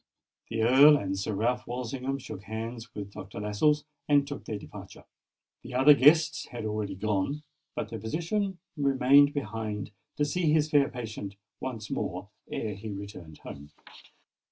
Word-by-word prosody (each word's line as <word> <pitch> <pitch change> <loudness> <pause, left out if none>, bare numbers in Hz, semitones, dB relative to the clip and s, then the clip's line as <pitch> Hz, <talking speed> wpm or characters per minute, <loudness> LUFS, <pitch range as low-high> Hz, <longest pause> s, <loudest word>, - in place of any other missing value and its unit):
The 115 -1 0
Earl 140 +5 +8
and 95 -6 -2
Sir 100 +2 -2
Ralph 120 +4 0
Walsingham 125 +2 -3
shook 125 -7 -8
hands 115 +2 -6
with 100 -1 -6
Dr. 95 +1 -8
Lascelles, 145 +9 +1 0.2
and 145 -1 +4
took 145 0 -7
their 110 - -3
departure. - - -11 0.6
The 125 +1 -8
other 135 +3 +8
guests 150 +2 +4
had 120 -3 -6
already 105 -2 -2
gone; 105 +9 -1 0.3
but 105 - -3
the 115 -1 -5
physician 175 - -2 0.2
remained 140 0 +5
behind 110 -5 -4 0.2
to 145 - +1
see 160 +1 +1
his 155 0 +2
fair 145 -2 +4
patient 110 -6 -6 0.2
once 115 -5 -5
more - - -3 0.2
ere 110 -2 -2
he 105 +3 -7
returned 100 -6 -8
home. 75 +1 -10
120 Hz, 155 wpm, -29 LUFS, 105-145 Hz, 0.6 s, Earl